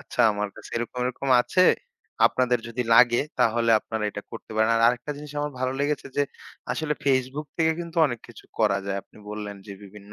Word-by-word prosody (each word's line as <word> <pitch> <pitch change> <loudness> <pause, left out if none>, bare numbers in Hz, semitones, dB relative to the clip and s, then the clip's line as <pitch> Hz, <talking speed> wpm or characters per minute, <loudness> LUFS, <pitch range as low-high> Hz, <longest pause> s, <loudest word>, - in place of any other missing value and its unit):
আচ্ছা - - -4
আমার 105 0 -2
কাছে - - -12
এরকম, 120 +1 -4
এরকম 130 +2 -3
আছে। 185 +8 +3 0.6
আপনাদের 125 -1 +1
যদি 120 +2 -2
লাগে, 120 0 +6 0.2
তাহলে 115 +1 +3
আপনারা 110 -1 -4
এটা 105 - -7
করতে 115 - -10
পারেন। 110 +1 +3
আর - - +2
আরেকটা 120 +4 0
জিনিস 150 0 -9
আমার 145 0 -3
ভালো 130 0 0
লেগেছে 145 0 -1
যে, 145 - +4 0.5
আসলে 155 -1 -1
Facebook 135 +2 0
থেকে 160 -1 +3
কিন্তু 170 0 -8
অনেক 120 -5 -4
কিছু 115 - -14
করা 105 -3 +3
যায়। 100 0 -1
আপনি - - -21
বললেন 105 -1 -6
যে, 100 - -7
বিভিন্ন 100 +1 -13
120 Hz, 195 wpm, -25 LUFS, 110-140 Hz, 0.6 s, লাগে